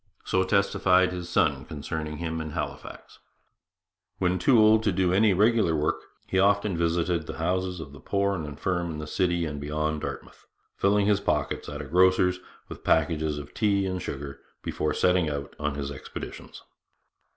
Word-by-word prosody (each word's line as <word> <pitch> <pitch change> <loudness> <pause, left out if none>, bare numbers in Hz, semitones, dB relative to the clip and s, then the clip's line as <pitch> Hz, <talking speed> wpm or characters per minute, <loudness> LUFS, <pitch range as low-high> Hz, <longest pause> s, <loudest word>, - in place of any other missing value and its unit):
So 95 - +2
testified 95 -1 +3
his 90 -1 -6
son - - +2
concerning 75 +1 -5
him 80 -1 -3
in 80 - -5
Halifax. 75 -1 -7 1.0
When 90 0 +1
too 115 +7 +4
old 110 0 +6
to 110 - +1
do 90 -1 +1
any 105 +2 +4
regular 105 -3 +3
work, 75 +1 0 0.2
he 95 - 0
often 100 0 +3
visited 85 -1 0
the - - -6
houses 90 +2 -1
of 70 -4 -8
the 70 - -12
poor 100 +5 0
and 85 -5 -3
infirm 85 +4 -2
in 80 - -5
the 75 - -5
city 85 +1 0
and 75 -2 -5
beyond 75 +1 -2
Dartmouth, - - -7 0.3
filling 100 +1 +2
his 100 -1 +3
pockets 75 -6 -1
at 75 0 -6
a - - -9
grocer's 90 +3 +3 0.3
with - - -10
packages 80 -1 +1
of 75 0 -8
tea 100 -3 +1
and 95 -1 -3
sugar 70 -1 -6 0.2
before 75 -1 -2
setting 90 -3 +2
out 70 -1 -5
on 75 -1 -2
his 70 -1 -4
expeditions. 70 - -9
85 Hz, 175 wpm, -26 LUFS, 75-95 Hz, 1.0 s, old